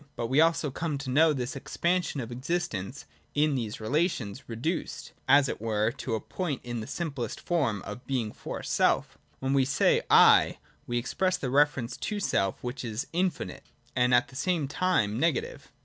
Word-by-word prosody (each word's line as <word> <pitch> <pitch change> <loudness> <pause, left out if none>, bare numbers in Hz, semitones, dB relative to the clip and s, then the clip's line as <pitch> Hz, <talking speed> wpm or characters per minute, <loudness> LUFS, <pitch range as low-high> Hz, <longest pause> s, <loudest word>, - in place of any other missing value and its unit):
But 120 - -2
we 135 +4 +4
also 165 -3 +2
come 155 +1 -2
to 135 -1 -5
know 155 +4 +5
this 130 -3 -3
expansion 170 +1 -1
of 120 0 -7
existence 125 - -3 0.3
(in 150 0 +3
these 115 -5 -3
relations) 130 - -1
reduced, 130 +10 -3 0.2
as 140 0 +6
it - - -4
were, 110 0 +1
to 120 -2 -3
a - - -1
point 155 - -4
in 120 -1 -4
the 110 - -6
simple 140 -8 -3
form 125 - -1
of 105 +5 -8
being 120 -6 -1
for - - -7
self. - - +1 0.2
/When 135 +1 +1
we 135 -1 +4
say 135 +1 +3
' - - -35 0.3
I,' - - 0 0.3
we 120 - -1
express 185 +10 0
the 125 - -3
reference 135 -3 +2
to 210 -1 -3
self 95 - 0
which 125 +2 -4
is 115 +1 -3
rrrfinite, 180 +1 -1 0.3
and 125 0 +3
at 125 +3 +4
the 135 - -15
same 160 0 0
time 135 - +1
negative. 455 - -1
135 Hz, 180 wpm, -28 LUFS, 120-160 Hz, 0.3 s, as